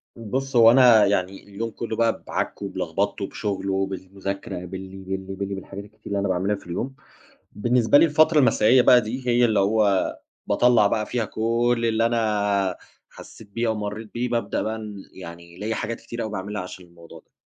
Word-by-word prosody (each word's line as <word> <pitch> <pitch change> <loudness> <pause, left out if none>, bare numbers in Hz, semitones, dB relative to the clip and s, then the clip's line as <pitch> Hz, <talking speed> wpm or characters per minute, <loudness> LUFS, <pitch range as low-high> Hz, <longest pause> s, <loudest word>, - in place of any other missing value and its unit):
بُص، 130 +4 -4
هو 115 -1 +8
أنا 120 -5 +7
يعني، 95 -1 -1
اليوم 110 +3 -5
كله 115 0 -5
بقى، 115 0 0
بعكِه - - -3
وبلخبِطه - - -2
بشغّله 95 -1 -3
وبالمذاكرة، 95 -1 -4
باللي، 95 +1 -8
باللي، 95 0 -6
باللي، 100 0 -4
بالحاجات 95 +1 -8
الكتير 105 +1 -20
اللي 100 -1 -1
أنا 100 - 0
باعملها 95 +3 0
في - - -14
اليوم. 125 +10 -4 0.6
بالنسبة 120 +4 +3
لي - - +6
الفترة 155 0 +4
المسائية 125 -1 +5
بقى 125 0 +6
دي 125 +4 -6
هي 120 0 +4
اللي 110 -3 +2
هو 100 -1 +2 0.3
باطلَّع 120 -4 +4
بقى 105 +1 -1
فيها 120 -3 -2
كل 115 +2 0
اللي 115 +1 +1
أنا 105 -5 0 0.3
حسِّيت 110 - -14
بيه 115 +3 -1
أو 110 - 0
مرِّيت 105 +1 -6
بيه. 125 +1 -2
بابدأ 115 -4 -1
بقى 110 +1 -3 0.3
يعني، 85 -1 -11
ليّا 110 +3 -3
حاجات 115 +1 -4
كتيرة 120 0 -6
أوي 110 - -5
باعملها 100 +2 -4
عشان 90 0 -9
الموضوع 85 -1 -15
ده. - - -31
105 Hz, 180 wpm, -23 LUFS, 95-115 Hz, 0.6 s, هو